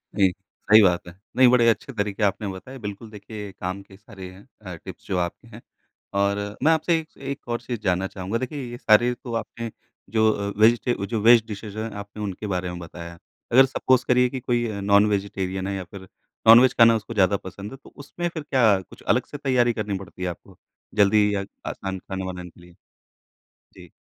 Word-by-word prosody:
जी, 95 -3 +4 0.4
सही 110 +1 +8
बात 90 -3 +2
है। 85 - -10 0.2
नहीं, 130 -1 +6
बड़े 120 -2 +4
अच्छे 130 +4 -1
तरीके 105 0 -2
आपने 100 +1 0
बताए। 100 +8 -8
बिल्कुल, 105 +1 -7
देखिए 105 -1 -8
काम 95 +2 -5
के 95 -1 -17
सारे 95 -3 -11
हैं 95 +7 -16
अ, 95 -3 -7
टिप्स 80 - -11
जो 95 - -1
आपके 85 -1 -3
हैं। - - -12 0.6
और 100 +1 +1 0.2
मैं 160 - +5
आपसे 160 +1 +2
एक 155 - -10
स - - -28
एक 135 -2 -6
और 120 0 -2
चीज़ 120 -2 -5
जानना 95 0 0
चाहूँगा। 95 +4 -4
देखिए, 130 +4 -4
ये 120 - -7
सारे 120 +3 +4
तो 120 -2 -6
आपने 115 +1 -7 0.4
जो 110 +1 +3
अ, 100 -1 -3
वेजी 115 +2 +6
टे 120 - +1
जो 110 -3 -2
वेज 115 0 +7
डिशेज़ 105 0 -7
हैं, 110 +1 -3
आपने 100 +1 -8
उनके 100 +1 -5
बारे 90 0 -2
में 90 0 -6
बताया। 85 0 -9 0.3
अगर 135 +2 +7
सपोज़ 130 -1 +1
करिए 125 0 +4
कि 130 - -5
कोई 120 -1 0
नॉन 100 +1 +5
वेजिटेरियन 95 -1 -2
है 100 - -2
या 95 - -4
फिर 95 +2 -12 0.4
नॉन-वेज 120 +3 +8
खाना 115 -1 +7
उसको 115 +1 -5
ज़्यादा 100 -1 +3
पसंद 100 +3 -9
है, 135 - -9
तो - - -14
उसमें 175 +5 -5
फिर 160 -3 -6
क्या 115 -9 +3
कुछ - - -16
अलग - - +1
से 145 - -8
तैयारी 125 -4 +2
करनी 105 -3 -3
पड़ती 90 -1 -12
है - - -1
आपको, 85 - -11 0.4
जल्दी 105 0 +4
या 100 - -1 0.3
आसान 95 -1 -5
खाना 95 +1 -6
बनाने 90 -1 -6
के 85 - -22
लिए? 90 0 -17 1.0
जी। - - -14
105 Hz, 210 wpm, -24 LUFS, 95-120 Hz, 1.0 s, सही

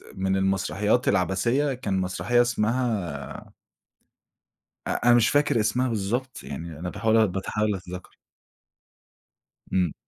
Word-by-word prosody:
من 95 0 0
المسرحيات 95 +5 +1
العَبَثية، 100 - +1
كان 110 -7 -2
مسرحية 105 +6 +1
اسمها 110 - -2 1.3
أ - - -1
أنا 120 - +7
مش 120 -2 +4
فاكر 145 -5 +2
اسمها 110 +4 +1
بالضبط، 120 +5 -2
يعني 80 +2 -7
أنا 90 +1 -4
باحاول 110 +2 +2
باحاول 100 +3 -1
أتذكّر. 90 -1 -9 1.6
إمم. 90 -4 +1
105 Hz, 105 wpm, -25 LUFS, 95-120 Hz, 1.6 s, أنا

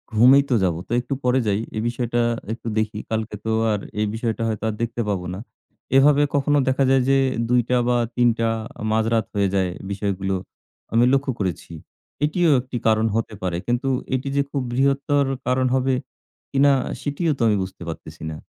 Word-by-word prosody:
"ঘুমিয়েই 130 +5 +7
তো 125 - +3
যাব। 90 -3 +1
তো - - -14
একটু 125 +3 -4
পরে 125 +1 +3
যাই, 100 0 +1 0.2
এই - - 0
বিষয়টা 120 0 -1 0.2
আর - - -13
একটু 115 0 -9
দেখি। 105 -1 -1
কালকে 110 -1 -2
তো 110 - 0 0.2
আর 105 - 0 0.2
এই 105 - +1
বিষয়টা 115 0 -2
হয়তো 110 -1 -3
আর - - -2
দেখতে 120 0 -2
পাবো 95 -3 -2
না।" 95 - -6 0.6
এভাবে 145 +1 +5
কখনো 145 +1 +2
দেখা 130 +1 +2
যায় 135 -1 +4
যে 135 - +5 0.3
২:০০ 125 0 +2
বা, 125 - +3 0.2
৩:০০ 120 -2 +2 0.3
আ - - -4
মাঝরাত 110 0 +1
হয়ে 100 -1 +2
যায়। 95 -2 +1 0.2
বিষয়গুলো 95 -1 -2 0.6
আমি 115 +1 +5
লক্ষ্য 135 0 +1
করেছি। 90 -3 -3 0.5
এটিও 170 +2 +2
একটি 125 -1 -6
কারণ 110 0 +3
হতে 115 -1 -1
পারে। 90 -2 -1
কিন্তু 120 +2 0 0.3
এটি 130 +2 -3
যে 140 - +3
খুব 140 - -1
বৃহত্তর 140 +2 +2 0.2
কারণ 130 +1 +2
হবে 130 0 +1 0.6
কিনা? 140 +1 +4 0.3
সেটিও 150 +3 -1
তো - - -7
আমি 105 -2 +3
বুঝতে 95 -1 -9
পারতেছি 80 -1 -8
না। 75 - -6
120 Hz, 185 wpm, -22 LUFS, 105-135 Hz, 0.6 s, ঘুমিয়েই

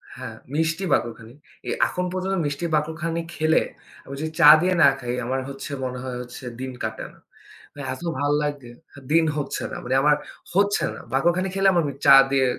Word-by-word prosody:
হ্যাঁ, 125 -3 -8 0.2
মিষ্টি 165 +4 0
বাকরখানি। 115 0 -2 0.3
এ - - -2 0.2
এখন 180 - -3
পর্যন্ত 190 +1 -2
মিষ্টি 145 +3 -3
বাকরখানি 160 +2 -2
খেলে, 160 +1 +3 0.4
আমি 135 - -9
যদি 160 - -3
চা 150 -3 +9
দিয়ে 185 +1 +2
না 145 - +8
খাই, 120 -1 -4
আমার 130 +2 -1
হচ্ছে 140 +2 -7
মনে 125 0 -4
হয় 130 -1 -5
হচ্ছে 125 +1 -10 0.2
দিন 130 0 -4
কাটে 110 0 -4
না। - - -22 0.5
মানে 145 - -9
এত 130 - -10 0.2
ভাল 145 0 +1
লাগে 145 -4 -4 0.2
হা 140 - -12
দিন 165 0 +4
হচ্ছে 140 -2 -3
না - - -5
মানে 125 +2 -1
আমার 150 +1 +4 0.4
হচ্ছে 200 +1 +2
না। - - -9
বাকরখানি 175 +7 +2
খেলে, 195 0 +3
আমার 170 - +2
ওই 140 - -7
চা 140 -1 +9 0.2
দিয়ে 135 -1 +3
145 Hz, 195 wpm, -23 LUFS, 130-165 Hz, 0.5 s, চা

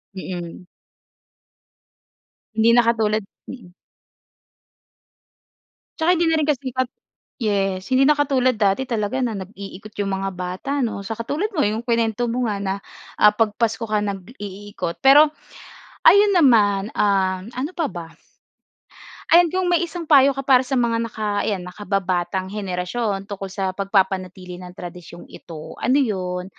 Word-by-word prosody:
Mm. 180 -2 -7 1.9
Hindi 220 +1 +4
na 240 - +6
katulad 220 -2 +1 0.3
mm. 235 -9 -11 2.3
Tsaka 330 +2 +3
hindi 340 -1 +2
na 320 - +2
rin 310 - +1
kasipag 260 -3 -1 0.6
yes 195 -3 -1
hindi 260 +1 +4
na 300 - +6
katulad 265 -3 +2
dati 210 +3 +1
talaga 220 0 -2
na 240 -3 -1
nag-iikot 200 +2 -9
yung 200 -1 -1
mga 195 - -1
bata 180 +9 -5
'no, 205 -3 -4
sa 210 +2 -5
katulad 295 - -2
mo 295 - +3
yung 215 +2 -1
kinuwento 230 -1 0
mo 245 +2 -1
nga 210 -3 -1
na, 195 -1 -1 0.4
ah, 210 0 +6
'pag 215 -1 +1
Pasko 230 -1 0
ka 215 -1 0
nag-iikot, 200 -2 -6
pero, 285 +3 +7 0.8
ayun 405 0 +7
naman, 210 - +4
um, 190 0 +1
ano 270 +6 -3
pa 330 - +1
ba? 170 -2 -7 1.3
Ayan, 345 0 +7
kung 370 -1 0
may 350 -1 +3
isang 340 0 -7
payo 280 -2 +6
ka - - -1
para 260 -2 +5
sa 270 - -4
mga 230 -1 +1
naka 210 -2 -2
ayan, 200 -4 -1
nakababatang 185 -1 -2
henerasyon 195 +1 -3
tungkol 195 -1 -5
sa 190 -1 -3
pagpapanatili 190 -2 -1
ng 180 0 -10
tradisyong 175 -1 -10
ito, 160 -3 -10
ano 255 +4 +3
yun? 180 -6 -2
210 Hz, 140 wpm, -21 LUFS, 190-255 Hz, 2.3 s, pero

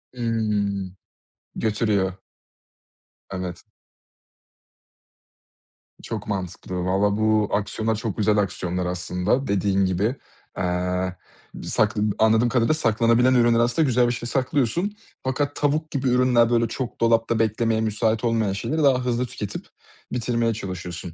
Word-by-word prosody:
Hımm, 105 -5 -1 0.6
götürüyor. 105 -4 0 1.2
Evet. 90 -2 -5 2.4
Çok 110 -3 -5
mantıklı. 95 -2 -4
Vallahi 100 +2 +1
bu 110 -1 +2
aksiyonlar 110 +2 0
çok 110 -2 -4
güzel 105 0 +2
aksiyonlar 90 -3 -1
aslında, 90 +8 -1
dediğin 100 -1 +1
gibi. 100 +7 0 0.4
Eee, 90 0 -1 0.4
bı - - -8
sakla 110 0 +1 0.2
anladığım 110 +2 +4
kadarıyla 120 +3 +2
saklanabilen 115 -2 +3
ürünler 120 -2 +4
aslında 120 +7 +2
güzel 125 -1 +3
bir - - +1
şey, 120 0 -5
saklıyorsun. 140 - 0 0.3
Fakat 145 +2 -1
tavuk 155 +2 0
gibi 135 -2 -1
ürünler, 125 -2 +4
böyle 115 -1 +2
çok 120 +1 -5
dolapta 115 0 +2
beklemeye 110 0 +1
müsait 110 +1 0
olmayan 115 -4 +1
şeyleri 155 +10 -1
daha 130 -3 +3
hızlı 125 0 0
tüketip 105 -4 -6 0.5
bitirmeye 115 -1 0
çalışıyorsun. 90 -4 -6
110 Hz, 120 wpm, -23 LUFS, 100-120 Hz, 2.4 s, anladığım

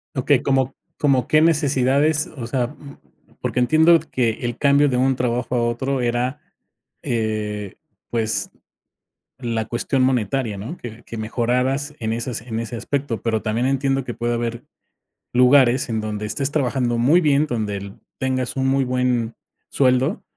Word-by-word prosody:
Okey. 135 0 +2
¿Cómo 135 -1 +1 0.2
cómo 135 -4 +2
qué 155 - +4
necesidades? 150 -1 +2
O 120 - -4
sea, 125 0 0
mm, 140 +1 -13 0.4
porque - - -1
entiendo 160 +6 +5
que 125 -7 0
el 120 0 -3
cambio 140 0 +4
de 125 - 0
un 130 +1 +2
trabajo 125 0 -1
a 120 - +2
otro 130 +3 -1
era, 125 +3 -1 0.6
eh, 110 -5 -2 0.3
pues, 110 -2 -1 0.9
la 115 -3 -2
cuestión 130 +3 0
monetaria, 125 -3 0
¿no?, 120 - -6
que 120 0 -9
que 115 - -8
mejoraras 125 +6 -1
en 110 -1 -1
esas 115 +1 -3
en 115 -2 -5
ese 115 +1 -5
aspecto. 130 0 -3
Pero 110 -2 0
también 115 +3 0
entiendo 135 0 0
que 120 - -5
puede 120 0 -1
haber 120 0 -3 0.7
lugares 125 0 +5
en 110 -2 -1
donde 105 0 -4
estés 135 +6 -1
trabajando 125 -4 0
muy 145 +9 +4
bien, 150 -2 +3
donde 110 -6 -2
el 100 0 -9 0.2
tengas 130 -1 -1
un 130 - +1
muy 135 0 +2
buen 125 -2 0 0.4
sueldo, 130 +2 +2
125 Hz, 155 wpm, -21 LUFS, 115-135 Hz, 0.9 s, entiendo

